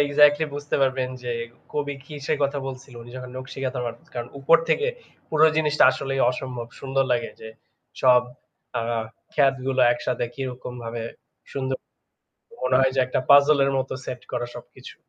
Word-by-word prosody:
Exactly 145 Hz, +2 st, +5 dB
বুঝতে 145 Hz, 0 st, -2 dB
পারবেন 130 Hz, -1 st, +1 dB
যে 120 Hz, -1 st, -2 dB, 0.4 s
কবি 145 Hz, -1 st, -2 dB
কিসের 150 Hz, +1 st, -3 dB
কথা 140 Hz, +1 st, +1 dB
বলছিল। 130 Hz, -1 st, -8 dB
উনি 120 Hz, -, -12 dB
যখন 125 Hz, -1 st, -7 dB
নকশি 130 Hz, +1 st, -8 dB
কাঁথার 130 Hz, -1 st, -2 dB
মাঠ 115 Hz, 0 st, -4 dB, 0.2 s
কারন 120 Hz, 0 st, -4 dB
উপর 165 Hz, +5 st, +6 dB
থেকে 455 Hz, +2 st, +2 dB, 0.4 s
পুরো 155 Hz, 0 st, +5 dB
জিনিসটা 150 Hz, -1 st, +4 dB
আসলেই 135 Hz, 0 st, -2 dB
অসম্ভব 125 Hz, -2 st, -5 dB
সুন্দর 135 Hz, 0 st, +1 dB
লাগে। 120 Hz, -, 0 dB
যে 110 Hz, -, -8 dB, 0.5 s
সব 125 Hz, -1 st, +6 dB, 0.5 s
অ্যা 115 Hz, 0 st, -1 dB, 0.4 s
ক্ষেতগুলো 135 Hz, -2 st, +2 dB
একসাথে 120 Hz, 0 st, -2 dB
কিরকমভাবে 125 Hz, -3 st, -5 dB, 0.5 s
সুন্দর। 130 Hz, -1 st, -2 dB, 0.9 s
মনে 130 Hz, 0 st, +4 dB
হয় 130 Hz, 0 st, +3 dB
যে -, -, +5 dB
একটা 130 Hz, -, 0 dB
পাজল 140 Hz, +1 st, +7 dB
এর 135 Hz, -, +2 dB
মত 130 Hz, 0 st, -2 dB, 0.2 s
সেট 125 Hz, -1 st, -5 dB
করা 120 Hz, -1 st, -1 dB
সবকিছু। -, -, -11 dB
130 Hz, 155 wpm, -24 LUFS, 125-140 Hz, 0.9 s, পাজল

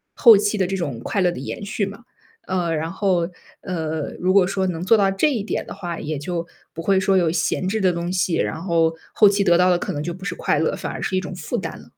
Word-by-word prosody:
后 230 Hz, -5 st, +8 dB
期 210 Hz, +1 st, 0 dB
的 190 Hz, -2 st, +1 dB
这 195 Hz, -, -2 dB
种 140 Hz, -10 st, -3 dB
快 200 Hz, -, -1 dB
乐 180 Hz, -1 st, +3 dB
的 125 Hz, -, -7 dB
延 145 Hz, +8 st, -6 dB
续 205 Hz, 0 st, -1 dB
嘛。 200 Hz, +4 st, -9 dB, 0.4 s
呃， 175 Hz, -3 st, 0 dB
然 160 Hz, +2 st, -3 dB
后， 185 Hz, -3 st, 0 dB, 0.3 s
呃， 160 Hz, -5 st, -3 dB
如 185 Hz, +1 st, +2 dB
果 190 Hz, -2 st, +5 dB
说 190 Hz, -1 st, -1 dB
能 170 Hz, -2 st, -3 dB
做 225 Hz, +4 st, +5 dB
到 195 Hz, -1 st, +3 dB
这 290 Hz, +10 st, +2 dB
一 225 Hz, -6 st, -1 dB
点 -, -, -2 dB
的 -, -, -6 dB
话， 175 Hz, -2 st, -5 dB
也 150 Hz, 0 st, -3 dB
就 170 Hz, +3 st, -4 dB, 0.3 s
不 165 Hz, -, -6 dB
会 190 Hz, +2 st, +2 dB
说 190 Hz, 0 st, +2 dB
有 170 Hz, -3 st, +2 dB
闲 175 Hz, +2 st, 0 dB
置 220 Hz, +3 st, 0 dB
的 185 Hz, -3 st, +2 dB
东 170 Hz, +1 st, -3 dB
西， 180 Hz, -2 st, +1 dB
然 -, -, -1 dB
后， 165 Hz, -2 st, +2 dB, 0.2 s
后 210 Hz, -2 st, +6 dB
期 200 Hz, 0 st, +1 dB
得 175 Hz, -3 st, +4 dB
到 180 Hz, +1 st, +4 dB
的 175 Hz, -, +4 dB
可 -, -, -4 dB
能 145 Hz, -, -3 dB
就 170 Hz, +2 st, -4 dB
不 190 Hz, +1 st, -10 dB
是 -, -, -2 dB
快 -, -, 0 dB
乐， -, -, 0 dB
反 -, -, -5 dB
而 -, -, -6 dB
是 190 Hz, -, -2 dB
一 -, -, +3 dB
种 185 Hz, 0 st, -7 dB
负 160 Hz, -, -5 dB
担 -, -, -5 dB
了。 -, -, -15 dB
180 Hz, 295 characters per minute, -22 LUFS, 170-195 Hz, 0.4 s, 后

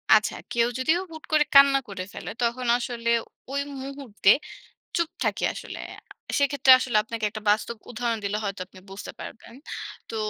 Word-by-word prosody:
আচ্ছা। 215 Hz, 0 st, +2 dB, 0.2 s
কেউ 235 Hz, 0 st, +3 dB
যদিও 315 Hz, +7 st, +3 dB
হুট 315 Hz, 0 st, -9 dB
করে 305 Hz, -1 st, +5 dB
কান্না 275 Hz, 0 st, +8 dB
করে 190 Hz, -2 st, -5 dB
ফেলে, -, -, -7 dB
তখন 240 Hz, +1 st, 0 dB
আসলে 235 Hz, -1 st, -3 dB, 0.4 s
ওই 280 Hz, 0 st, 0 dB, 0.2 s
মুহূর্তে 265 Hz, -8 st, +1 dB, 0.6 s
চুপ 335 Hz, -1 st, +1 dB
থাকি -, -, 0 dB
আসলে। -, -, -8 dB, 0.2 s
আ -, -, -33 dB, 0.4 s
সেক্ষেত্রে 280 Hz, -2 st, +4 dB
আসলে 245 Hz, -4 st, +1 dB
আপনাকে 225 Hz, 0 st, -3 dB
একটা 215 Hz, +1 st, -7 dB
বাস্তব 215 Hz, +3 st, +1 dB, 0.2 s
উদাহরণ 235 Hz, -1 st, -1 dB
দিলে 205 Hz, +1 st, 0 dB
হয়তো 200 Hz, -2 st, -3 dB
আপনি 185 Hz, -, -15 dB
বুঝতে 195 Hz, +1 st, -7 dB
পারবেন। 225 Hz, -, -10 dB, 0.6 s
তো -, -, -5 dB
235 Hz, 165 wpm, -26 LUFS, 215-275 Hz, 0.6 s, কান্না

